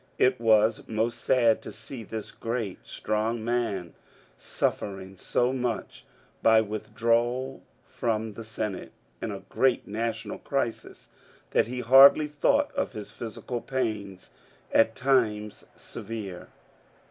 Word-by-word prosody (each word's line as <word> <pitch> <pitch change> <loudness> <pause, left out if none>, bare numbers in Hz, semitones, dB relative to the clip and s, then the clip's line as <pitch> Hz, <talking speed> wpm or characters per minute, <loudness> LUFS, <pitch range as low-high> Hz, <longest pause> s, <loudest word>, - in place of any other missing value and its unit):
It 130 0 +3
was 110 -1 +3
most 115 +2 -1
sad 115 -3 +4
to - - -8
see 125 -4 -8
this 110 0 -6
great 115 -5 -4
strong 110 +1 -2
man 115 -8 -1 0.4
suffering 95 -1 -3
so 125 +6 0
much 125 -3 -3 0.4
by 110 0 +6
withdrawal 115 +4 0 0.2
from 110 -2 -2
the 115 - -8
Senate 110 -3 -5 0.3
in - - -3
a - - -6
great 130 -2 +2
national 110 +2 -3
crisis 135 -5 -3 0.4
that - - +3
he 125 +1 -4
hardly 135 +5 +8
thought 280 - +2
of 280 - -2
his 105 -2 -7
physical 120 +1 -5
pains, 105 -8 -3 0.4
at 115 0 +4
times 110 -6 +1
severe. 105 -4 -7
115 Hz, 120 wpm, -27 LUFS, 105-125 Hz, 0.4 s, hardly